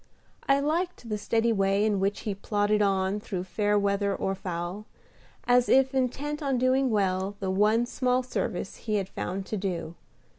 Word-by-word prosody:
I 275 0 +5
liked 315 -3 -2
the 210 - -1
steady 230 +2 +1
way 195 0 +2
in 210 -2 +1
which 195 +1 0
he 210 - -2
plodded 205 +1 0
on 195 0 +1
through 190 -3 -4
fair 205 +2 0
weather 200 0 +1
or 195 - -1
foul, 185 +2 -5 0.6
as 245 0 +3
if 265 0 +4
intent 275 +4 -1
on 275 -3 0
doing 255 +1 +2
well 195 -2 0
the 190 -2 -2
one 215 +4 +3
small 250 0 0
service 195 -6 -3
he 215 -2 -2
had 195 -2 0
found 190 0 -4
to 215 - -3
do. 175 -4 -3
210 Hz, 175 wpm, -27 LUFS, 195-250 Hz, 0.6 s, I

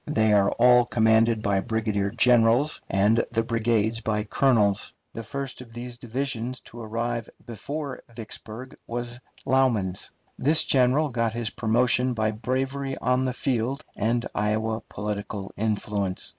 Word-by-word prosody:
They 110 -8 +2
are 100 -1 +4
all 125 0 +5
commanded 110 -1 +3
by 100 -1 +2
brigadier 105 -2 -1
generals, 120 +5 +3
and 105 +4 +3
the 115 -1 +1
brigades 115 -1 +1
by 105 -1 -1
colonels. 105 -3 +2 0.2
The 115 - -5
first 135 +4 -5
of 115 -2 -13
these 120 0 -8
divisions 125 0 -3
to 120 - -11
arrive 115 +1 -3 0.2
before 140 +5 -5
Vicksburg 115 +2 -9
was 120 +1 -5 0.3
Lauman's. 120 -9 +1 0.3
This 155 +3 +4
general 135 +4 +3
got 115 -3 -1
his 120 -2 -2
promotion 125 +3 +2
by 110 -1 +1
bravery 135 +4 -2
on 125 +2 +1
the 130 - -1
field 130 +3 -1
and 115 +3 0
Iowa 110 +2 -1
political 105 -1 -5
influence. 105 -3 -2
115 Hz, 135 wpm, -25 LUFS, 110-125 Hz, 0.3 s, all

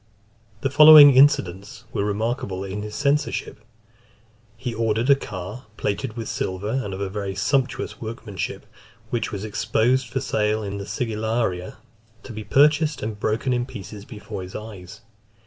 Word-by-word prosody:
The 135 - -1
following 150 -1 +10
incidents 110 -7 +2
were 100 - 0
remarkable 105 -2 -2
in 100 +1 -5
his 105 0 -7
censorship. 145 +1 -1 1.0
He 125 0 -4
ordered 115 +3 +1
a - - +8
car, 105 -1 -8
plated 110 +4 -3
with 115 -2 -4
silver, 95 +3 -3
and 125 -7 -2
of 95 0 -4
very 100 -2 -4
sumptuous 130 +4 -1
workmanship, 110 -5 -6 0.5
which 120 - -2
was 100 -1 -5
exposed 115 +4 +1
for 125 +3 -3
sale 105 -2 0
in 100 0 -5
the 100 - -7
Sigillaria, 110 -6 -2 0.5
to 120 - -9
be 110 0 -6
purchased, 150 +7 +3
and 105 -1 -4
broken 110 +5 0
in 120 0 -1
pieces 100 -1 -9
before 105 -4 -8
his 90 0 -9
eyes. 105 -1 -9
110 Hz, 145 wpm, -23 LUFS, 100-125 Hz, 1.0 s, following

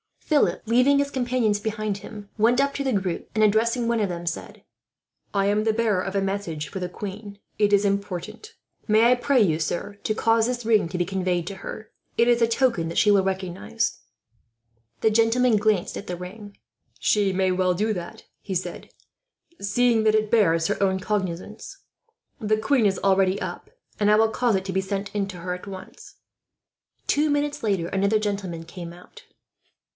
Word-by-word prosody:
Philip, 300 -3 +1
leaving 250 +5 +4
his 280 0 0
companions 245 -5 0
behind 215 -1 -2
him, 205 -1 -10
went 235 +4 +4
up 280 0 0
to 280 - -2
the 260 - +1
group 190 -4 -2
and, 215 - +3
addressing 230 +3 +2
one 235 -1 +1
of 210 - +1
them, 175 -1 -5
said: 165 - -5 0.7
"I 195 -1 +2
am 210 +1 +2
the 220 0 +2
bearer 215 -4 +1
of 195 +1 -5
a 195 - +2
message 195 -7 -3
for 190 - -5
the 180 -1 -3
queen. 200 +2 -7 0.2
It 205 -1 +3
is 200 0 +5
important. 200 - -3 0.3
May 225 +2 +5
I - - +6
pray 255 +1 +2
you, 160 -6 +2
sir, 200 +5 -3
to 215 - -1
cause 225 0 +2
this 245 -2 -3
ring 220 -5 +3
to 180 - -4
be 175 - +2
conveyed 180 -2 -1
to 195 - -5
her. 215 +3 -8 0.3
It 235 +1 +4
is 240 0 +3
a 230 - +5
token 230 -8 +1
that 165 - -5
she 210 - +5
will 200 -1 +4
recognize." 185 - -2 1.0
The 220 - +3
gentleman 230 +1 +3
glanced 210 -3 0
at - - -8
the 180 - -3
ring. 200 +4 -10 0.4
"She 205 -2 +2
may 190 0 +1
well 185 0 +2
do 215 +4 0
that," 175 -3 -7 0.2
he 195 - -5
said, 180 - -4 0.7
"seeing 230 +2 +2
that 215 0 +4
it 215 -1 0
bears 165 -7 +3
her - - -2
own 190 -1 +2
cognizance. 210 - -4 0.6
The 215 -2 +1
queen 230 +2 +2
is 195 -1 0
already 195 0 +2
up, - - -6 0.3
and 205 -1 +3
I 210 - +6
will 220 +1 +4
cause 235 -1 +1
it 190 - -1
to 190 - -4
be 190 - +1
sent 195 +1 -4
in 200 -2 -1
to 185 -2 -8
her, 180 +1 -3
at 180 +2 -8
once." 190 -1 -10 0.9
Two 300 +1 +2
minutes 290 0 0
later 195 -6 0
another 200 +2 +2
gentleman 200 -5 -3
came 170 0 -9
out. 180 +1 -15
205 Hz, 195 wpm, -24 LUFS, 190-225 Hz, 1.0 s, I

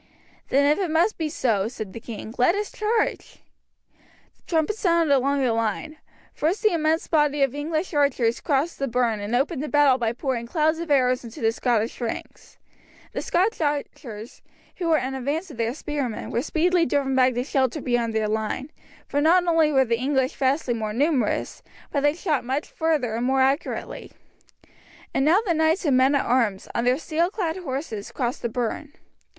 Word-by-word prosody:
"Then 280 +1 +3
if 295 +4 +3
it 375 -4 -1
must 340 +7 +1
be 315 -1 -1
so," 220 -9 0
said 220 -5 -7
the - - -7
king, 225 -1 -8
"let 255 +9 +4
us 415 0 -3
charge." 430 +1 -1 1.0
The - - -36
trumpet 325 +4 +1
sounded 335 -7 +3
along 275 +1 +1
the 245 -3 +2
line. 230 +8 -2 0.4
First 340 +9 -1
the 430 - +4
immense 320 0 +1
body 295 -3 +2
of 270 -2 +1
English 310 +4 -3
archers 265 -5 +1
crossed 300 +2 0
the 275 - -1
burn 235 -3 0
and 205 +4 -2
opened 275 +3 0
the 300 - -3
battle 290 -3 +4
by 230 -1 0
pouring 240 -2 -3
clouds 315 +4 +1
of 335 -1 -5
arrows 255 -3 +2
into 230 -1 -10
the 225 0 +2
Scottish 230 0 -1
ranks. 235 - -6 0.6
The - - -2
Scotch 380 +3 0
archers, 260 -7 -4 0.4
who 350 - -2
were 320 -1 +4
in 265 -1 -2
advance 290 +7 -3
of 270 - -11
their 230 +2 -1
spearmen, 285 -7 -4
were 235 - 0
speedily 335 +4 +1
driven 270 0 0
back 255 -1 +3
to 245 - 0
shelter 270 +1 0
beyond 240 -4 -1
their 215 -1 +1
line, 220 +6 -3 0.4
for 285 - 0
not 350 +4 +4
only 325 -3 +3
were 265 -2 +4
the 230 -1 0
English 265 0 0
vastly 265 -1 +1
more 215 -2 -3
numerous, 280 +2 0 0.3
but 285 - +1
they 290 +1 +2
shot 320 -5 -1
much 265 +5 -2
further 305 -8 -1
and 235 +2 -1
more 265 0 +3
accurately. 275 +4 -2 1.0
And 270 - +1
now 335 +8 +4
the 350 - +2
knights 320 +3 +1
and 280 -4 +3
men 260 +2 +4
at 280 - +1
arms, 230 -6 +1
on 235 - -1
their 250 +1 +3
steel 330 +2 0
clad 370 -5 -2
horses, 265 - -5
crossed 245 -2 -3
the 235 - -2
burn. 250 +5 -3
275 Hz, 190 wpm, -24 LUFS, 240-315 Hz, 1.0 s, let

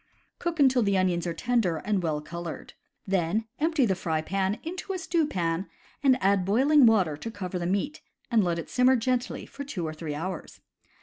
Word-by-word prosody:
Cook 340 -2 -3
until 260 -3 +5
the 200 -3 +2
onions 180 -2 +1
are 170 - -1
tender 225 -5 +1
and 200 +4 -1
well 155 -3 -1
colored. 170 +1 -7 0.3
Then 195 +3 0
empty 315 -3 +2
the 195 - +2
fry 160 -3 -1
pan 195 +3 -1
into 360 +4 -5
a - - -2
stew 335 -3 0
pan 170 - -2 0.3
and 265 -3 +4
add 195 -1 +3
boiling 260 +8 +5
water 190 -9 +3
to 230 - -6
cover 185 -4 -5
the 175 - -2
meats 205 - -1 0.3
and 225 -3 +4
let 170 -2 0
it 165 - -5
simmer 255 +1 +4
gently 250 +1 -1
for 280 - -8
two 195 -12 -4
or 155 - -3
three 155 -1 -5
hours. 185 +5 -5
195 Hz, 195 wpm, -27 LUFS, 175-255 Hz, 0.3 s, until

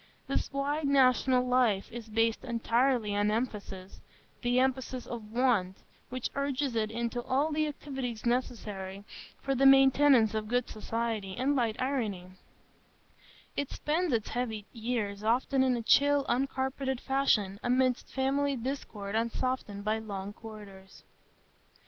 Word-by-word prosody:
This - - -2
wide 285 +2 -1
national 255 -2 +4
life 245 -6 +2
is 230 -1 -8
based 225 +1 +1
entirely 235 -2 +1
on 205 +1 +2
emphasis,—the 215 +2 -4
emphasis 260 -1 -1
of 220 -3 -7
want, 225 -7 +1 0.3
which 255 -1 -4
urges 280 -2 -1
it 215 -1 0
into 235 +2 -2
all 275 +6 0
the 310 0 +1
activities 265 -6 -5
necessary 210 -6 -2 0.4
for 275 - 0
the 270 +1 +5
maintenance 270 -4 +6
of 215 -1 -2
good 245 +2 0
society 220 -3 -3
and 275 +3 +1
light 235 -3 0
irony; 215 -9 -2 1.2
it 285 - -2
spends 330 +2 -1
its 225 -4 0
heavy 225 -4 -3
years 220 -4 -3
often 255 +4 +2
in 255 -2 +3
a 230 - -4
chill, 285 +3 +4
uncarpeted 265 0 -1
fashion, 220 -9 +1
amidst 255 0 +1
family 275 +1 +1
discord 230 -5 -5
unsoftened 230 -2 -2
by 215 +1 +1
long 200 -2 -6
corridors. 205 -4 -12
245 Hz, 130 wpm, -30 LUFS, 215-265 Hz, 1.2 s, maintenance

